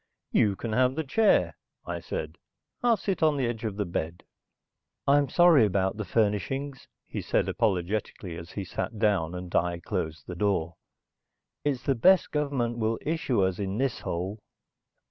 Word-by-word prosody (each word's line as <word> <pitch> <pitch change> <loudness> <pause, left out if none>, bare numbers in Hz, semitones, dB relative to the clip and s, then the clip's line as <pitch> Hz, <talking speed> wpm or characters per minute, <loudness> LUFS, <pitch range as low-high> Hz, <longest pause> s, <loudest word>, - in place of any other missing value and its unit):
"You 100 -2 +3
can 110 +2 -4
have 130 +2 +3
the 160 - -1
chair," 210 +10 +3 0.3
I - - -3
said. - - -5 0.4
"I'll 235 -2 +4
sit 195 -4 -2
on 155 -2 +3
the 135 - +1
edge 115 -1 -3
of 110 -3 -2
the 105 - 0
bed." 85 -1 -4 0.8
"I'm 140 -1 +4
sorry 175 -6 +6
about 95 -1 +1
the 105 - -3
furnishings," 120 +7 -1 0.2
he - - -5
said - - +1
apologetically 95 -3 -1
as 85 0 -9
he 100 - -3
sat 110 - -4
down 95 -6 +1
and 90 -1 -7
I 85 0 +2
closed 80 -5 -4
the 90 - -6
door. 90 -3 0 0.9
"It's 135 -4 -1
the 135 - +2
best 180 +10 +4
government 135 -6 -1
will 110 0 0
issue 145 -9 0
us 95 0 0
in 100 0 -2
this 135 -1 0
hole." 95 +5 -4
110 Hz, 165 wpm, -27 LUFS, 95-135 Hz, 0.9 s, sorry